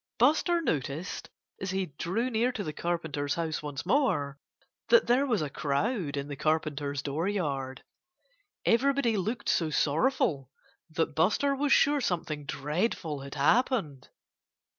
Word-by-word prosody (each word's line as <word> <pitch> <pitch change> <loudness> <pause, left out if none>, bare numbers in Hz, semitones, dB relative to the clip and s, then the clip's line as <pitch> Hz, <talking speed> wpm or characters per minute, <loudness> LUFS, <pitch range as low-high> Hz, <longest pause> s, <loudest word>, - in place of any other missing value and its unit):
Buster 315 +7 +3
noticed, 150 - -3 0.3
as 190 - -3
he 190 0 -1
drew 225 +9 -1
near 235 +2 +2
to 215 - -3
the 155 - -4
Carpenter's 160 -5 -2
house 165 -2 -2
once 145 -1 -5
more, 175 - +1 0.5
that 480 0 +6
there 260 +4 +3
was 220 - +1
a 150 - -3
crowd 150 - -1
in 140 0 -3
the 145 - -5
Carpenter's 145 -1 -1
dooryard. 145 -4 -2 0.8
Everybody 255 -1 +3
looked 215 +5 -2
so 165 -2 +2
sorrowful 150 - +1 0.4
that 160 -1 -1
Buster 210 - +2
was 280 +1 0
sure 290 0 +4
something 165 - -2
dreadful 155 - -2
had 140 +1 -8
happened. 150 - +1
165 Hz, 135 wpm, -29 LUFS, 145-235 Hz, 0.8 s, that